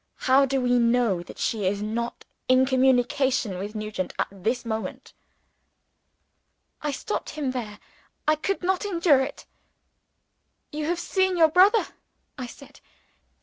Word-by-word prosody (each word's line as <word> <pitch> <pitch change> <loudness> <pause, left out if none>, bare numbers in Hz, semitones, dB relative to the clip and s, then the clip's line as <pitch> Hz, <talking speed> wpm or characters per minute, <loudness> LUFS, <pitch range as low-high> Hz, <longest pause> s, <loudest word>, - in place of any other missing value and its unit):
How 270 +1 +5
do 270 +1 0
we 245 -1 +2
know 235 -6 +2
that 175 - -12
she 210 -4 -1
is 200 +2 -1
not 235 +2 -4 0.2
in 255 0 +5
communication 260 -4 +2
with 205 +3 -6
Nugent 215 -3 -4
at - - -1
this 225 +6 -2
moment?" 220 -1 -5 1.7
I 300 - -2
stopped 350 +9 -4
him 285 -4 -3
there 220 -5 -5 0.5
I 310 - +5
could 380 +5 -3
not 370 +2 +1
endure 340 -8 +3
it. 265 +2 -5 1.3
"You 300 0 -3
have 345 +2 -1
seen 375 +1 0
your 325 -2 +6
brother," 380 +7 +5 0.5
I 255 -2 -6
said. 275 +3 -14
260 Hz, 140 wpm, -25 LUFS, 225-305 Hz, 1.7 s, your